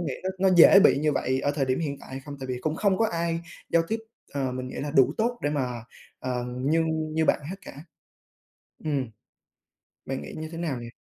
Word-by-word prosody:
nghĩ 145 -7 -2
nó 190 - -1 0.2
nó 185 - +4
dễ 195 +4 +9
bị 165 - +6
như 150 0 +2
vậy 130 0 0
ở 145 - +1
thời 145 -2 0
điểm 130 +4 0
hiện 140 -3 -3
tại - - -13
hay 135 +1 -5
không? 145 -1 -7
Tại 130 - -5
vì 125 -1 -3
cũng 155 0 -1
không 200 -3 +2
có 225 - +3
ai 170 -2 -1 0.3
giao 165 0 +5
tiếp, 225 - 0 0.3
ờ, 135 -3 -1
mình 130 0 -4
nghĩ - - -8
là 145 +1 -3
đủ 135 -1 +4
tốt 240 +2 0
để 145 - +1
mà, 125 -5 -2 0.4
ờm, 125 -1 -3
nhưng 160 -1 0
như 160 0 +2
bạn - - +3
hết 195 - -5
cả. - - -7 1.1
Ừm, 135 -6 -1 1.0
bạn 135 0 -3
nghĩ - - -8
như 155 0 -5
thế 165 - -7
nào 155 -8 -2
nhỉ? 120 - -7
145 Hz, 235 wpm, -26 LUFS, 130-165 Hz, 1.1 s, dễ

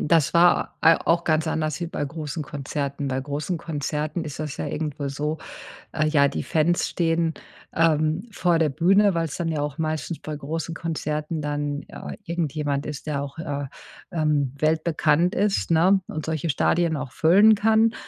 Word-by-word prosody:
das 160 -1 +2
war, 175 +1 +4
äh, 165 0 +7
auch 170 +1 +3
ganz 160 0 +1
anders 155 -1 -1
wie 170 - -2
bei 165 - -3
großen 150 +1 -5
Konzerten. 140 0 -4
Bei 130 0 -1
großen 145 +5 -3
Konzerten 155 +1 -3
ist 150 -1 -6
das 150 -3 -4
ja - - -3
irgendwo 150 -2 -3
so, 150 +3 -3 0.5
äh, 155 0 +1
ja, 145 -2 +4
die 140 - -2
Fans 165 +2 +1
stehen, 165 -1 0 0.4
ähm, 160 +3 +2
vor 175 -4 +2
der 160 -1 +3
Bühne, 195 +6 +4
weil's 165 -3 -2
dann 170 - -2
ja 155 -2 -1
auch 145 -2 -4
meistens 155 0 -2
bei 155 - -6
großen 160 +3 -4
Konzerten 155 -1 -3
dann, 145 -1 -2
äh, - - -8
irgendjemand 150 -5 -2
ist, 150 0 -6
der 140 -2 -1
auch, 140 +2 -8
äh, 145 -4 -3 0.4
ähm, 150 -6 +1
weltbekannt 160 +3 +2
ist, 205 -6 +1
ne? 180 +4 +4
Und 155 -1 -5
solche 160 0 -1
Stadien 165 +3 +2
auch 140 -3 -5
füllen 200 +7 +6
kann. 220 +2 +3
155 Hz, 175 wpm, -24 LUFS, 145-165 Hz, 0.5 s, äh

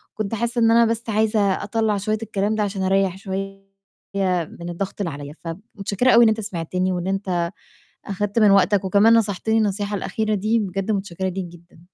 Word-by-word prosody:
كنت 215 +1 -3
حاسّة 235 +2 -1
إن 225 0 +5
أنا 235 0 +6
بس 230 +1 -1
عايزة 215 0 +1 0.2
أطلّع 215 0 0
شوية 215 +2 -1
الكلام 210 0 -1
ده 215 - 0
عشان 195 -2 -3
أريّح 190 -1 +1
شوية 195 0 -6 0.9
من 170 - -6
الضغط 195 +3 -4
اللي 170 -5 -2
عليَّ، 145 +1 -8
فب 165 +1 -6 0.2
متشكرة 205 +5 +1
أوي 235 0 +7
إن 225 - +6
أنت 220 0 -1
سمعتني 185 -1 -2
وإن 175 +1 -3
أنت 185 -3 -1 0.5
أخدت 205 +2 -1
من 210 -2 +6
وقتك، 195 0 +3
وكمان 205 +4 +5
نصحتني 220 0 +1
النصيحة 205 -1 0
الأخيرة 215 +1 -1
دي، 215 +4 +1
بجد 195 +1 -2
متشكرة 190 -2 -2
ليك 185 0 -4
جدًا. 170 -1 -16
200 Hz, 185 wpm, -22 LUFS, 190-215 Hz, 0.9 s, أوي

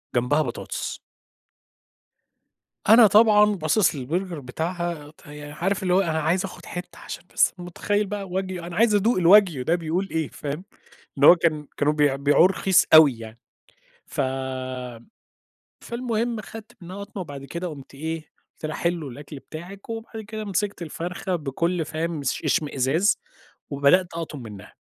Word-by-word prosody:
جنبها 125 +5 +2
بطاطس. 120 - -5 1.9
أنا 225 +1 +8
طبعًا 210 0 +6
باصص 175 +4 +2
للBurger 170 +7 -3
بتاعها 160 +3 -4
ت - - -20
يعني 150 0 -9
عارف 190 +6 -1
اللي 180 -1 +1
هو 190 - +5
أنا 160 -3 -1
عايز 175 +5 +1
آخد - - -10
حتّة 180 0 -8
عشان - - -8
بس - - +3
متخيل 195 +4 -1
بقى 200 0 -4
wagyu 185 -1 -3
أنا 175 0 -7
عايز 220 0 +4
أدوق 210 +2 +2
الwagyu 180 -4 +6
ده 165 +6 +2
بيقول 175 +3 -2
إيه، 160 -3 -1
فاهم؟ 145 +4 -6 0.6
إن 140 - +3
هو 175 - +10
كان 155 -3 0
كانوا 150 +1 +2
بيبيعوه 145 +2 +4
رخيص 190 -1 +3
أوي 150 -7 +8
يعني. 110 0 -10 0.7
ف - - -3 1.6
فالمهم 235 -1 -2
خدت 215 +1 -11
منها 180 +2 -9
قطمة 200 -1 -7
وبعد 140 -4 -9
كده 170 +5 -5
قمت 140 -4 -11
إيه، 160 +3 -4 0.3
قلت - - -6
لها: 155 - -4
"حلو 170 -4 -1
الأكل 145 +3 -9
بتاعِك" 175 +8 -10
وبعد 225 0 -6
كده 215 0 -6
مسكت 200 -1 -2
الفرخة 180 +3 -3
بكل 165 +3 -1
فاهم 160 0 -3
اش 135 - -2
اشمئزاز 150 - +1 0.5
وبدأت 140 +6 +4
أقطم 160 -5 -6
منّها. 105 -4 -11
170 Hz, 150 wpm, -24 LUFS, 150-195 Hz, 1.9 s, هو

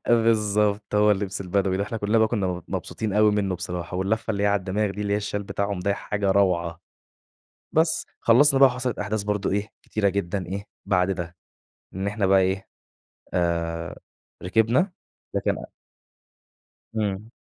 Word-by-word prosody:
بالضبط، 105 -3 +2
هو 105 0 +5
اللبس 100 -2 -1
البدوي 95 0 0
ده. 100 - 0
إحنا 110 +2 -4
كُلّنا 105 +2 +2
بقى 110 0 +4
كُنّا 105 -5 0
م 90 -1 -3
مبسوطين 110 -2 -3
أوي 105 +1 +5
منّه 100 -2 0
بصراحة 90 -1 -4
واللفة 110 +4 -1
اللي 100 -2 -1
هي - - +3
عالدماغ 100 +1 +1
دي 100 - -6
اللي 100 -1 -1
هي - - +3
الشَال 105 0 -3
بتاعهم 100 0 -2
ده 100 +2 +1
حاجة 100 -1 -1
روعة. 90 -4 +1 0.9
بس، 160 +1 +2
خلّصنا 135 +4 +5
بقى 135 - +9
وحصلت 125 -1 -3
أحداث 105 +1 -1
برضه 105 -1 -1
إيه، 105 +2 -1
كتيرة 105 -2 0
جدًا 95 -1 -2
إيه، 100 +3 -4 0.2
بعد 90 -2 +2
ده. 90 -2 -4 0.6
إن 95 +1 -2
إحنا 105 0 0
بقى 95 0 +5
إيه، 95 +1 -1 0.7
آآ 85 -1 -1 0.4
ركبنا، 115 - +2 0.4
لكن - - +1 1.4
إمم. 105 0 -2
100 Hz, 160 wpm, -25 LUFS, 95-105 Hz, 1.4 s, بقى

